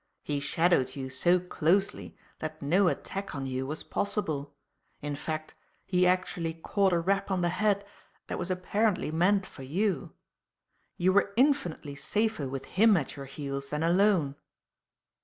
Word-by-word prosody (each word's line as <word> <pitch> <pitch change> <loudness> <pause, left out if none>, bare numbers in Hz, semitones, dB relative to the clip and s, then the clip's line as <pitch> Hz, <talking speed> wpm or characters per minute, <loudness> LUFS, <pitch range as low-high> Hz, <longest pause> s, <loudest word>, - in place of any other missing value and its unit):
He 145 -1 -1
shadowed 145 -2 +2
you 130 -1 -5
so 175 +8 +3
closely 180 +2 0 0.2
that 155 0 -5
no 180 +7 +3
attack 195 +1 -3
on 135 -1 -3
you 130 0 -2
was 155 +3 -4
possible; 150 -9 -2 0.4
in 145 0 -4
fact, 155 +1 -4 0.3
he 180 -1 +3
actually 180 -3 0
caught 195 +4 +1
a 170 - +3
rap 195 +4 0
on 190 -2 0
the 175 - +2
head 200 +2 +1 0.4
that - - -4
was 175 - -3
apparently 185 0 0
meant 185 +4 +3
for - - -12
you. 175 +5 -1 0.8
You 185 +1 +3
were 200 0 +3
infinitely 235 - +2
safer 205 +3 -1
with 135 0 -5
him 215 0 +4
at 145 - -3
your 140 - -7
heels 140 0 -5
than 150 +2 -1
alone." 170 -5 +3
175 Hz, 155 wpm, -29 LUFS, 145-195 Hz, 0.8 s, him